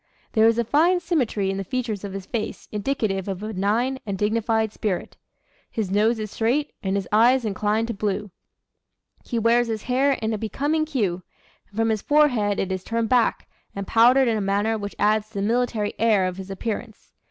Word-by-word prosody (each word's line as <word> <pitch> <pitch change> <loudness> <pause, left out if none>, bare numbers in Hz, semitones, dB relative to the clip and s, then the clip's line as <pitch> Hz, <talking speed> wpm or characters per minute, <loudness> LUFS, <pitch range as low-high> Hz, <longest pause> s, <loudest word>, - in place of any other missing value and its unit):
There 220 -1 +5
is 230 0 +3
a 235 - +2
fine 330 +9 +3
symmetry 255 - 0
in 195 - -3
the 195 - -2
features 220 -1 -3
of 200 -1 -5
his 195 -1 -6
face 220 0 -4
indicative 210 -4 -1
of 195 0 -4
a - - -3
benign 225 +7 0
and 200 -2 -4
dignified 220 +1 0
spirit. 200 -5 -3 0.5
His 210 -5 -3
nose 215 +4 +3
is 215 -2 -5
straight, 255 +7 0
and 195 -2 -1
his 195 -2 -2
eyes 235 +4 +4
inclined 215 +2 0
to - - -1
blue. 205 -1 -2 0.9
He 235 - -3
wears 230 +1 +3
his 220 -2 -3
hair 265 +3 +2
in 220 -3 -2
a 215 - -3
becoming 290 +8 -1
cue, 205 - -1 0.5
and 205 - -16
from 225 0 +2
his 215 -2 0
forehead 245 -10 +3
it 190 - -1
is 185 -1 -3
turned 230 -1 -1
back, 245 -3 +2 0.3
and 200 0 -4
powdered 245 +5 +5
in 225 -2 +1
a - - -1
manner 200 +3 +1
which 205 -2 -5
adds 215 0 +2
to 220 - -28
the 195 - -1
military 225 -1 0
air 215 -4 +3
of 185 0 -3
his 190 0 -8
appearance. 220 +3 -6
220 Hz, 200 wpm, -24 LUFS, 200-240 Hz, 0.9 s, There